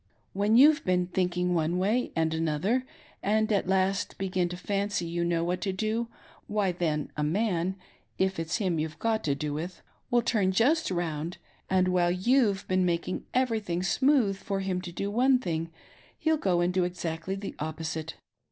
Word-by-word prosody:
When 205 Hz, +3 st, +3 dB
you've 300 Hz, +4 st, +6 dB
been 180 Hz, -1 st, +2 dB
thinking 180 Hz, 0 st, 0 dB
one 165 Hz, +1 st, +1 dB
way 215 Hz, +7 st, +1 dB
and 160 Hz, -1 st, +1 dB
another, 165 Hz, -, 0 dB, 0.3 s
and 215 Hz, +2 st, +1 dB
at 200 Hz, -3 st, +1 dB
last 190 Hz, +1 st, +1 dB
tfegin 185 Hz, -2 st, 0 dB
to 180 Hz, -, -5 dB
fanqy 200 Hz, -1 st, -2 dB
you 170 Hz, +1 st, -1 dB
know 170 Hz, -1 st, +1 dB
what 180 Hz, +1 st, -1 dB
to 195 Hz, -, -1 dB
do, 220 Hz, +4 st, -1 dB, 0.4 s
why 205 Hz, -3 st, +1 dB
then, 160 Hz, -4 st, -2 dB
a 150 Hz, -, -2 dB
man^if 180 Hz, +2 st, 0 dB, 0.6 s
.it's 165 Hz, 0 st, -1 dB
him 185 Hz, -7 st, 0 dB
you've 155 Hz, 0 st, -3 dB
got 225 Hz, -1 st, 0 dB
to 140 Hz, -2 st, +1 dB
do 150 Hz, 0 st, -3 dB
with 170 Hz, +5 st, -5 dB
— -, -, -41 dB
will 240 Hz, -1 st, +3 dB
turn 210 Hz, -5 st, +1 dB
just 275 Hz, -, +3 dB
round, 170 Hz, -2 st, -3 dB, 0.3 s
and 185 Hz, -1 st, +3 dB
^hilie 180 Hz, 0 st, +1 dB
you've 235 Hz, -6 st, +3 dB
been 185 Hz, 0 st, +2 dB
making 175 Hz, +1 st, -1 dB
everything 220 Hz, -9 st, 0 dB
smooth 240 Hz, 0 st, +3 dB
for 195 Hz, 0 st, -3 dB
him 185 Hz, -1 st, -1 dB
to 180 Hz, -1 st, -7 dB
do 200 Hz, +4 st, -3 dB
one 255 Hz, +4 st, +4 dB
thing, 165 Hz, -8 st, -3 dB, 0.5 s
he'll 320 Hz, 0 st, +2 dB
go 185 Hz, -, +1 dB
and 175 Hz, +1 st, +1 dB
do 185 Hz, -1 st, +2 dB
exactly 175 Hz, +1 st, -3 dB
the 195 Hz, 0 st, -6 dB
opposite. 160 Hz, +1 st, -4 dB
185 Hz, 180 wpm, -28 LUFS, 170-210 Hz, 0.6 s, you've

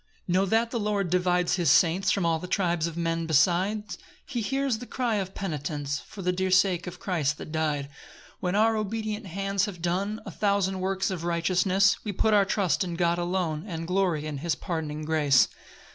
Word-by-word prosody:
3 175 Hz, -, -2 dB
Know 190 Hz, +2 st, +3 dB
that 225 Hz, +3 st, +2 dB
the 235 Hz, -, -1 dB
Lord 205 Hz, -4 st, -1 dB
divides 180 Hz, 0 st, +2 dB
his 170 Hz, -5 st, +2 dB
saints 175 Hz, +7 st, +4 dB
From 185 Hz, -1 st, +1 dB
all 165 Hz, -1 st, +1 dB
the 180 Hz, -, -7 dB
tribes 170 Hz, -3 st, 0 dB
of 170 Hz, 0 st, -7 dB
men 165 Hz, -1 st, -1 dB
beside; 180 Hz, +7 st, +2 dB, 0.4 s
He 245 Hz, -4 st, -3 dB
hears 270 Hz, 0 st, 0 dB
the 245 Hz, -, -8 dB
cry 240 Hz, -4 st, -1 dB
of 190 Hz, -1 st, -4 dB
penitents 145 Hz, -5 st, -3 dB
For 195 Hz, -, -10 dB
the 180 Hz, -, +2 dB
dear 185 Hz, +1 st, -1 dB
sake 185 Hz, -1 st, +3 dB
of 180 Hz, 0 st, -7 dB
Christ 150 Hz, -6 st, -1 dB
that -, -, -8 dB
dy'd. 155 Hz, -3 st, -1 dB
4 -, -, -16 dB, 0.5 s
When 180 Hz, 0 st, -1 dB
our 220 Hz, +2 st, +4 dB
obedient 215 Hz, 0 st, -3 dB
hands 195 Hz, +2 st, -1 dB
have 195 Hz, -5 st, -7 dB
done 190 Hz, +5 st, -1 dB
A -, -, -6 dB
thousand 200 Hz, -2 st, 0 dB
works 190 Hz, +1 st, -1 dB
of 175 Hz, -3 st, -4 dB
righteousness, 185 Hz, +3 st, +2 dB
We 210 Hz, -, -3 dB
put 215 Hz, +3 st, +2 dB
our 200 Hz, -1 st, +5 dB
trust 195 Hz, -2 st, +1 dB
in 175 Hz, -2 st, -4 dB
God 170 Hz, 0 st, +1 dB
alone, 175 Hz, -3 st, -1 dB
And 165 Hz, -3 st, -4 dB
glory 180 Hz, -4 st, 0 dB
in 150 Hz, -2 st, -4 dB
his 165 Hz, +2 st, -1 dB
pardoning 155 Hz, -4 st, -4 dB
grace. 150 Hz, -4 st, +4 dB
180 Hz, 205 wpm, -27 LUFS, 165-200 Hz, 0.5 s, our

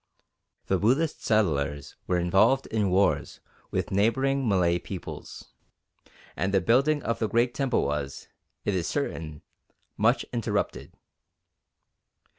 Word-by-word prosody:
The 95 Hz, -, +1 dB
Buddhist 135 Hz, -, +1 dB
settlers 75 Hz, -10 st, 0 dB
were 90 Hz, -, +1 dB
involved 95 Hz, +10 st, +3 dB
in 105 Hz, -3 st, 0 dB
wars 95 Hz, +2 st, +1 dB, 0.3 s
with -, -, -2 dB
neighbouring 130 Hz, +6 st, +1 dB
Malay 90 Hz, -3 st, +2 dB
peoples, 90 Hz, 0 st, -8 dB, 0.9 s
and 95 Hz, +2 st, -1 dB
the 95 Hz, -, +4 dB
building 135 Hz, -, +2 dB
of 115 Hz, -, -1 dB
the 110 Hz, -, 0 dB
great 120 Hz, +1 st, +2 dB
temple 135 Hz, -3 st, 0 dB
was, 70 Hz, -1 st, -4 dB, 0.4 s
it 100 Hz, -, +1 dB
is 90 Hz, -2 st, -1 dB
certain, 80 Hz, -, -4 dB, 0.5 s
much 115 Hz, +5 st, +2 dB
interrupted. 115 Hz, -3 st, -2 dB
105 Hz, 115 wpm, -27 LUFS, 90-125 Hz, 0.9 s, the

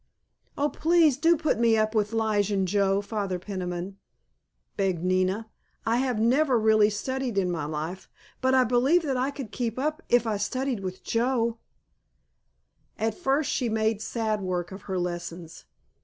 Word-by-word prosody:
"Oh, 285 Hz, -, +2 dB
please 320 Hz, 0 st, +3 dB
do 330 Hz, +4 st, +3 dB
put 305 Hz, -7 st, 0 dB
me 230 Hz, -1 st, +4 dB
up 215 Hz, 0 st, +1 dB
with 210 Hz, -1 st, +1 dB
Lige 215 Hz, -2 st, +1 dB
and 195 Hz, -2 st, +1 dB
Joe, 195 Hz, +1 st, +2 dB
Father 200 Hz, -3 st, -3 dB
Peniman," 185 Hz, 0 st, -5 dB, 0.8 s
begged 190 Hz, -4 st, -1 dB
Nina; 185 Hz, +4 st, +1 dB, 0.4 s
"I 230 Hz, +1 st, +2 dB
have 250 Hz, -3 st, 0 dB
never 255 Hz, +4 st, +3 dB
really 215 Hz, -1 st, +4 dB
studied 250 Hz, +2 st, -3 dB
in 185 Hz, -2 st, +1 dB
my 160 Hz, -4 st, -2 dB
life, 155 Hz, +5 st, -5 dB, 0.3 s
but 260 Hz, 0 st, +3 dB
I 260 Hz, -, +6 dB
believe 255 Hz, +8 st, +3 dB
that 275 Hz, -4 st, -1 dB
I 255 Hz, +2 st, 0 dB
could 270 Hz, -6 st, -7 dB
keep 235 Hz, -2 st, -3 dB
up 305 Hz, +3 st, -1 dB
if 240 Hz, -1 st, +4 dB
I 215 Hz, -2 st, 0 dB
studied 255 Hz, +4 st, -2 dB
with 185 Hz, -1 st, -6 dB
Joe." 235 Hz, -1 st, 0 dB, 1.4 s
At 220 Hz, +1 st, 0 dB
first 285 Hz, -4 st, 0 dB
she 245 Hz, -, 0 dB
made 220 Hz, -1 st, 0 dB
sad 220 Hz, -2 st, -2 dB
work 180 Hz, -1 st, -3 dB
of 190 Hz, +1 st, -10 dB
her 190 Hz, -, -1 dB
lessons. 175 Hz, -1 st, -5 dB
220 Hz, 165 wpm, -26 LUFS, 190-255 Hz, 1.4 s, I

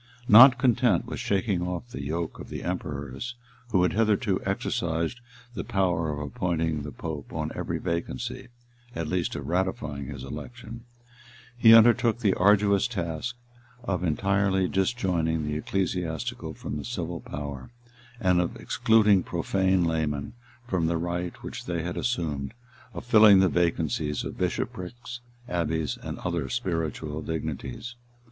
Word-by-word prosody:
Not 120 Hz, +4 st, +9 dB
content 120 Hz, -6 st, +3 dB
with -, -, -6 dB
shaking 100 Hz, -2 st, 0 dB
off 90 Hz, +6 st, -4 dB
the -, -, -5 dB
yoke 80 Hz, +4 st, -3 dB
of -, -, -9 dB
the -, -, -6 dB
emperors, 80 Hz, -, -4 dB, 0.3 s
who 95 Hz, -6 st, +3 dB
had 90 Hz, -, +2 dB
hitherto 110 Hz, -2 st, +1 dB
exercised 85 Hz, +7 st, -1 dB, 0.3 s
the 90 Hz, -7 st, -4 dB
power 90 Hz, -4 st, 0 dB
of 75 Hz, -, -4 dB
appointing 80 Hz, +1 st, -1 dB
the 75 Hz, +1 st, -6 dB
pope 75 Hz, -3 st, -6 dB
on -, -, -3 dB
every -, -, -3 dB
vacancy, 85 Hz, -6 st, -4 dB, 0.5 s
at 80 Hz, -2 st, -3 dB
least 90 Hz, +1 st, -1 dB
of -, -, -5 dB
ratifying 80 Hz, -6 st, -2 dB
his 70 Hz, -3 st, -7 dB
election, 115 Hz, -, -8 dB, 0.7 s
he 115 Hz, -2 st, +8 dB
undertook 115 Hz, 0 st, +5 dB
the 105 Hz, -5 st, +2 dB
arduous 100 Hz, +2 st, +4 dB
task 90 Hz, 0 st, -3 dB, 0.5 s
of 95 Hz, -6 st, -2 dB
entirely 95 Hz, +3 st, +1 dB
disjoining 90 Hz, -6 st, 0 dB
the 75 Hz, -, -2 dB
ecclesiastical 90 Hz, -2 st, -2 dB
from -, -, -5 dB
the 75 Hz, -, -5 dB
civil 85 Hz, -7 st, -4 dB
power, 70 Hz, -3 st, -7 dB, 0.5 s
and 90 Hz, -4 st, +3 dB
of 85 Hz, -, -3 dB
excluding 105 Hz, -4 st, +3 dB
profane 95 Hz, +1 st, +1 dB
laymen 75 Hz, -3 st, -1 dB, 0.3 s
from 90 Hz, -7 st, 0 dB
the 85 Hz, 0 st, +1 dB
right 85 Hz, +1 st, -4 dB
which -, -, -7 dB
they 85 Hz, -2 st, -2 dB
had 90 Hz, +1 st, -3 dB
assumed, 80 Hz, -, -2 dB, 0.4 s
of -, -, -6 dB
filling 110 Hz, -4 st, +7 dB
the 95 Hz, -1 st, +4 dB
vacancies 80 Hz, -4 st, 0 dB
of -, -, -5 dB
bishoprics, 120 Hz, +6 st, -4 dB, 0.3 s
abbeys, 80 Hz, -, -1 dB
and -, -, -5 dB
other 85 Hz, -6 st, -2 dB
spiritual 80 Hz, -2 st, -2 dB
dignities. 80 Hz, -, -5 dB
90 Hz, 140 wpm, -27 LUFS, 80-100 Hz, 0.7 s, Not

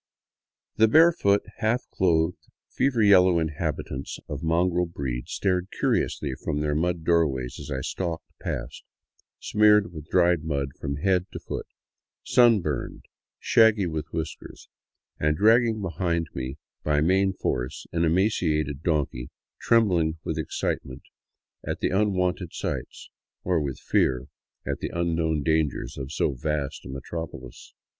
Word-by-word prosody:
The 110 Hz, +1 st, +6 dB
barefoot, 155 Hz, -8 st, +4 dB
half 115 Hz, +3 st, 0 dB
clothed, 85 Hz, -2 st, +1 dB, 0.2 s
fever 125 Hz, -5 st, +1 dB
yellow 95 Hz, -3 st, +6 dB
inhabitants 75 Hz, -4 st, -3 dB
of 75 Hz, -1 st, -5 dB
mongrel 85 Hz, +2 st, +1 dB
breed 65 Hz, -7 st, -4 dB
stared 90 Hz, -1 st, 0 dB
curiously 70 Hz, -3 st, 0 dB
from 75 Hz, -1 st, -1 dB
their 75 Hz, 0 st, 0 dB
mud 85 Hz, +2 st, -1 dB
doorways 75 Hz, -7 st, +1 dB
as -, -, -8 dB
I 65 Hz, -2 st, -2 dB
stalked 85 Hz, 0 st, -3 dB
past, -, -, -5 dB, 0.6 s
smeared 105 Hz, -3 st, +4 dB
with 75 Hz, -2 st, -9 dB
dried 90 Hz, -3 st, +3 dB
mud 70 Hz, -3 st, -2 dB
from 70 Hz, -, -3 dB
head 90 Hz, +4 st, +1 dB
to -, -, -5 dB
foot, -, -, -6 dB, 0.6 s
sunburned, 115 Hz, -, +2 dB, 0.3 s
shaggy 110 Hz, -3 st, +4 dB
with 80 Hz, -3 st, -3 dB
whiskers, 80 Hz, -2 st, -6 dB, 0.5 s
and 75 Hz, 0 st, +1 dB
dragging 110 Hz, +1 st, +4 dB
behind 85 Hz, -2 st, -1 dB
me 65 Hz, +2 st, -5 dB, 0.3 s
by 75 Hz, -1 st, +2 dB
main 95 Hz, +4 st, +3 dB
force 65 Hz, -8 st, -3 dB
an 85 Hz, 0 st, 0 dB
emaciated 80 Hz, -5 st, +1 dB
donkey 75 Hz, -7 st, -1 dB, 0.3 s
trembling 90 Hz, -9 st, +2 dB
with 80 Hz, 0 st, -3 dB
excitement 65 Hz, -4 st, -3 dB, 0.6 s
at -, -, -4 dB
the -, -, 0 dB
unwonted 90 Hz, -3 st, 0 dB
sights, -, -, -5 dB, 0.3 s
or 90 Hz, -3 st, +1 dB
with 70 Hz, -3 st, -3 dB
fear 65 Hz, -1 st, 0 dB, 0.4 s
at -, -, -3 dB
the -, -, -3 dB
unknown 80 Hz, -3 st, 0 dB
dangers 80 Hz, -3 st, 0 dB
of 70 Hz, 0 st, -6 dB
so -, -, +1 dB
vast 70 Hz, +2 st, -3 dB
a -, -, -9 dB
metropolis. 70 Hz, -2 st, -8 dB
85 Hz, 130 wpm, -26 LUFS, 75-95 Hz, 0.6 s, The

